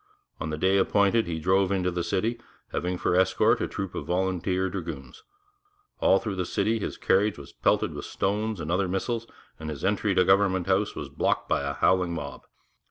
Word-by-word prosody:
On -, -, -3 dB
the 75 Hz, -, -3 dB
day 95 Hz, +4 st, +3 dB
appointed 100 Hz, +3 st, +3 dB
he 85 Hz, -2 st, -2 dB
drove 95 Hz, +4 st, +2 dB
into 90 Hz, -2 st, +1 dB
the 85 Hz, 0 st, -2 dB
city, 110 Hz, +8 st, -1 dB, 0.3 s
having 90 Hz, +1 st, -2 dB
for 90 Hz, -, 0 dB
escort 95 Hz, 0 st, +3 dB
a -, -, 0 dB
troop 95 Hz, -2 st, -5 dB
of -, -, -5 dB
volunteer 95 Hz, +1 st, 0 dB
dragoons. 85 Hz, -7 st, -6 dB, 0.8 s
All 95 Hz, -, +5 dB
through 100 Hz, -1 st, -4 dB
the 90 Hz, -, 0 dB
streets 110 Hz, -1 st, 0 dB
his -, -, -4 dB
carriage 105 Hz, +2 st, +2 dB
was 70 Hz, -, -11 dB
pelted -, -, +1 dB
with -, -, -6 dB
stones 105 Hz, +1 st, -1 dB
and 80 Hz, +1 st, -4 dB
other 95 Hz, +2 st, +1 dB
missiles, 115 Hz, +5 st, -2 dB, 0.3 s
and 80 Hz, 0 st, -5 dB
his 75 Hz, +1 st, -5 dB
entry 100 Hz, 0 st, +1 dB
to 90 Hz, -, +4 dB
Government 95 Hz, -2 st, +3 dB
House -, -, +1 dB
was -, -, -6 dB
blocked -, -, 0 dB
by -, -, +1 dB
a 70 Hz, 0 st, -2 dB
howling 90 Hz, 0 st, +2 dB
mob. 75 Hz, -3 st, -7 dB
95 Hz, 195 wpm, -27 LUFS, 85-100 Hz, 0.8 s, All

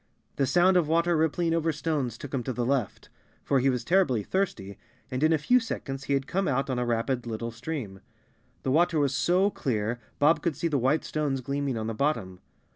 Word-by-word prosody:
The 135 Hz, -, +2 dB
sound 180 Hz, +4 st, +4 dB
of 170 Hz, -4 st, +2 dB
water 170 Hz, +2 st, +2 dB
rippling 165 Hz, +2 st, +1 dB
over 165 Hz, 0 st, +1 dB
stones 145 Hz, -6 st, -2 dB
took 145 Hz, +2 st, -9 dB
him 135 Hz, -, 0 dB
to 130 Hz, -, -2 dB
the 120 Hz, 0 st, -2 dB
left, 130 Hz, -3 st, -2 dB, 0.3 s
for 140 Hz, -, +2 dB
he 135 Hz, +2 st, +3 dB
was 125 Hz, -2 st, -1 dB
terribly 150 Hz, -, +2 dB
thirsty 105 Hz, -, -2 dB, 0.3 s
and 130 Hz, +1 st, -2 dB
in 155 Hz, +1 st, +4 dB
a 160 Hz, -, +4 dB
few 250 Hz, -, +3 dB
seconds 135 Hz, -, -5 dB
he 140 Hz, -, 0 dB
had 135 Hz, -1 st, 0 dB
come 190 Hz, +5 st, -1 dB
out 135 Hz, 0 st, 0 dB
on 125 Hz, -, -1 dB
a 125 Hz, -, 0 dB
rapid 120 Hz, +1 st, -1 dB
little 115 Hz, +1 st, -4 dB
stream. 115 Hz, -5 st, -6 dB, 0.6 s
The 130 Hz, -, 0 dB
water 165 Hz, +2 st, +3 dB
was 140 Hz, -2 st, +1 dB
so 180 Hz, +9 st, +2 dB
clear 115 Hz, -, -2 dB, 0.2 s
Bob 150 Hz, +3 st, +4 dB
could 170 Hz, -4 st, -1 dB
see 165 Hz, +4 st, -1 dB
the 145 Hz, -4 st, 0 dB
white 135 Hz, +6 st, +2 dB
stones 145 Hz, -4 st, -2 dB
gleaming 140 Hz, -1 st, -2 dB
on 110 Hz, -, -3 dB
the 115 Hz, -, -2 dB
bottom. 110 Hz, -8 st, -1 dB
140 Hz, 215 wpm, -27 LUFS, 125-160 Hz, 0.6 s, sound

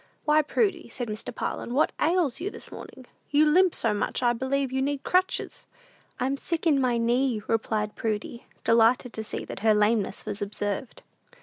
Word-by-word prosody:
"Why, 305 Hz, 0 st, +5 dB
Prudy," 350 Hz, +3 st, 0 dB
said 245 Hz, -3 st, -5 dB
Mr. 215 Hz, 0 st, -4 dB
Parlin, 240 Hz, -, -3 dB
"what 295 Hz, -, +3 dB
ails 320 Hz, -4 st, +1 dB
you 380 Hz, -, -1 dB
this -, -, -9 dB
morning? 260 Hz, -, -10 dB, 0.2 s
You 295 Hz, +1 st, +4 dB
limp 355 Hz, +4 st, +4 dB
so 225 Hz, -2 st, +1 dB
much 205 Hz, -, -1 dB
that 245 Hz, -, +3 dB
I -, -, +2 dB
believe 265 Hz, +2 st, -1 dB
you 265 Hz, 0 st, 0 dB
need 280 Hz, 0 st, -1 dB
crutches." 370 Hz, +1 st, 0 dB, 0.5 s
"I'm 270 Hz, +2 st, 0 dB
sick 335 Hz, +3 st, -3 dB
in 290 Hz, -4 st, +4 dB
my 245 Hz, -2 st, +2 dB
knee," 240 Hz, -1 st, +1 dB
replied 215 Hz, -1 st, -1 dB
Prudy, 220 Hz, +2 st, -4 dB, 0.2 s
delighted 230 Hz, +2 st, +3 dB
to 220 Hz, -, -4 dB
see 215 Hz, -, -5 dB
that -, -, -7 dB
her 215 Hz, +1 st, +4 dB
lameness 210 Hz, -1 st, +1 dB
was 205 Hz, -, -4 dB
observed. 205 Hz, +3 st, -4 dB
250 Hz, 185 wpm, -26 LUFS, 220-295 Hz, 0.5 s, Why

